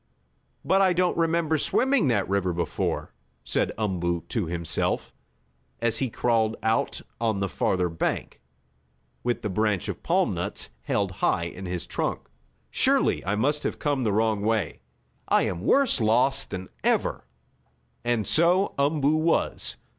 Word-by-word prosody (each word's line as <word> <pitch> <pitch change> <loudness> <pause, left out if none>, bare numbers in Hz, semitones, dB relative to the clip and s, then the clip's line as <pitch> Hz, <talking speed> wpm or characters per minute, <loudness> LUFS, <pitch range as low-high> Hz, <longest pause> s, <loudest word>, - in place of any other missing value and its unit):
"But 195 +1 +3
I 190 -2 +4
don't 180 0 +1
remember 165 -1 +1
swimming 260 - +2
that 105 -6 +1
river 95 -2 0
before," 85 0 -2 0.3
said - - 0
Umboo 85 -5 -1
to 110 -8 -1
himself, 85 -2 -2 0.7
as 115 -1 +1
he 130 - 0
crawled 115 -1 +1
out 110 0 0 0.2
on 110 -3 0
the 100 - 0
farther 90 +3 0
bank, 80 -1 -3 0.8
with 120 0 -1
the - - 0
branch 105 -1 0
of - - -5
palm - - +1
nuts - - -4
held - - -1
high 85 - +2
in 90 +2 -6
his 90 -1 -3
trunk. - - -2 0.5
"Surely - - +2
I 100 - +1
must 145 +7 +1
have - - -3
come 145 -3 0
the 110 - +1
wrong 110 0 +1
way. 110 -5 0 0.5
I - - +3
am 85 - -2
worse 260 - +3
lost 120 +5 +3
than 95 0 -6
ever!" - - 0 0.8
And 120 -3 0
so 175 +4 +3
Umboo 145 +1 +2
was. 165 +1 0
110 Hz, 145 wpm, -26 LUFS, 95-150 Hz, 0.8 s, I